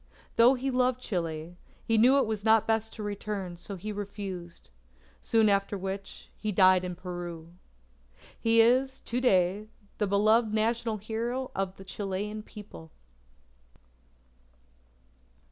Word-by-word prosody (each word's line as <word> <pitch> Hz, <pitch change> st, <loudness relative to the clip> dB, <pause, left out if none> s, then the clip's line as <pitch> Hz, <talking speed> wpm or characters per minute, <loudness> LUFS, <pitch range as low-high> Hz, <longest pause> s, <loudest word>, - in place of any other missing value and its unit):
Though 240 Hz, +3 st, +6 dB
he 265 Hz, +1 st, -2 dB
loved 250 Hz, 0 st, +1 dB
Chile, 170 Hz, -6 st, -4 dB, 0.3 s
he 225 Hz, -, +2 dB
knew 250 Hz, +5 st, +6 dB
it 275 Hz, -, +3 dB
was 215 Hz, -2 st, -3 dB
not 220 Hz, -1 st, +4 dB
best 225 Hz, 0 st, 0 dB
to 215 Hz, -, -6 dB
return, 205 Hz, -3 st, -4 dB
so 185 Hz, +3 st, -7 dB
he 210 Hz, +4 st, -6 dB
refused. 195 Hz, -, -7 dB, 0.5 s
Soon 225 Hz, -1 st, +3 dB
after 200 Hz, 0 st, +1 dB
which, 195 Hz, +1 st, -6 dB
he 215 Hz, -, -3 dB
died 185 Hz, -1 st, +5 dB
in 180 Hz, -1 st, -4 dB
Peru. 175 Hz, -2 st, -7 dB, 0.9 s
He 230 Hz, 0 st, +5 dB
is, 260 Hz, +3 st, +3 dB
to 245 Hz, +2 st, -2 dB
day, 195 Hz, -3 st, +2 dB, 0.3 s
the 210 Hz, -, +1 dB
beloved 215 Hz, +3 st, +3 dB
National 225 Hz, 0 st, 0 dB
Hero 230 Hz, +5 st, -3 dB
of 190 Hz, -1 st, -2 dB
the 195 Hz, -, -12 dB
Chilean 205 Hz, +2 st, -4 dB
People. 205 Hz, -6 st, -12 dB
210 Hz, 130 wpm, -29 LUFS, 185-225 Hz, 0.9 s, Though